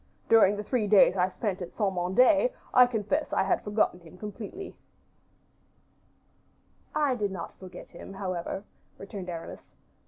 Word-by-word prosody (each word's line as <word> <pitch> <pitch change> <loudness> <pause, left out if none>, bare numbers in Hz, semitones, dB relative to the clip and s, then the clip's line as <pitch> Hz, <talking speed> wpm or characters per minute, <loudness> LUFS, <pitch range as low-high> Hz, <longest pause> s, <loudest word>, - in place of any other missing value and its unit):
During 210 -3 +6
the 210 - -4
three 220 -1 0
days 200 -2 +6
I 185 0 +2
spent 195 -1 -3
at 175 - -7
Saint 200 -3 0
Mande, 225 - +4 0.2
I 250 -1 +8
confess 245 +6 -1
I - - +2
have 195 - +1
forgotten 210 -3 +1
him 170 +1 -15
completely." 215 - -7 2.2
"I 290 -3 +2
do 210 -4 -1
not 190 - -7
forget 185 -1 -11
him, - - -11
however," 190 -1 -4 0.3
returned 195 -2 -7
Aramis. 165 -1 -8
200 Hz, 145 wpm, -28 LUFS, 185-225 Hz, 2.2 s, I